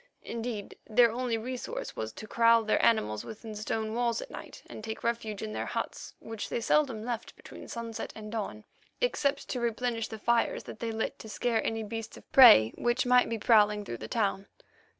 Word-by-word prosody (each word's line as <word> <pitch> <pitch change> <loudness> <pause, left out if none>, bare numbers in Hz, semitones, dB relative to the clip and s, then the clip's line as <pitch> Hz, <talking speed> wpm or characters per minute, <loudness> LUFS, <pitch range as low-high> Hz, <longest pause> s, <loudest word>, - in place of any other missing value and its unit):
Indeed, 230 -3 -5
their 235 +1 +5
only 240 -1 -1
resource 250 +2 -5
was 110 0 -4
to - - -9
kraal 230 +1 +4
their 215 - +1
animals 110 - +2
within 220 0 -8
stone 215 +1 -3
walls 235 -1 0
at - - -8
night - - -10
and - - -10
take 220 0 -6
refuge 225 -3 -2
in 215 0 -4
their - - -3
huts, - - -5
which 225 -2 -6
they - - -1
seldom 235 -2 +1
left 240 -2 -4
between - - -12
sunset 230 -1 -5
and 215 -1 -8
dawn, 200 - -4 0.4
except 285 - 0
to 250 - -2
replenish 235 -1 -1
the 220 - -7
fires 235 +2 +1
that - - -10
they 230 -1 -2
lit 220 0 -3
to 220 - -9
scare 230 +1 0
any 225 0 -2
beast 225 +1 -6
of - - -17
prey 220 - +9
which 240 +1 +1
might 250 0 +5
be 230 - -1
prowling 210 -2 +4
through 120 - -5
the 110 - -6
town. 200 - -1
225 Hz, 195 wpm, -29 LUFS, 215-235 Hz, 0.4 s, prey